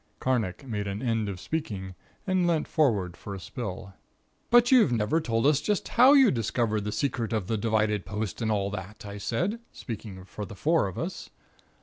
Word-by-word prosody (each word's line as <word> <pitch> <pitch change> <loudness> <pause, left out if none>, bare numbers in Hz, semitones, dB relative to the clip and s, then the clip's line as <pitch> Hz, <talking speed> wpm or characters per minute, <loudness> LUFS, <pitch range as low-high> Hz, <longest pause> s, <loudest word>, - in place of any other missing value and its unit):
Carnacki 120 -4 -1
made 105 -4 -3
an 100 +4 -4
end 115 -4 0
of 95 -2 -5
speaking 100 - -4 0.3
and 185 -2 +2
leant 165 -3 +1
forward 105 - +1
for 100 +1 -7
a - - -7
spill. 95 -3 -6 0.6
"But 240 +1 +5
you've 240 - +6
never 120 +8 +1
told 115 -4 0
us 145 0 +4
just 210 -2 -1
how 255 +4 +7
you 270 -6 +7
discovered 110 -2 0
the 105 - -2
secret 120 -3 -1
of 110 -5 -1
the 110 - -1
divided 110 -2 +1
post 105 +4 -4
and 110 - 0
all 100 -2 0
that," 105 +2 -7
I 100 0 -7
said, 175 - -1
speaking 100 -5 -8
for 105 - -7
the 100 +1 -8
four 160 0 +2
of 95 - -7
us. - - -5
110 Hz, 195 wpm, -27 LUFS, 100-145 Hz, 0.6 s, how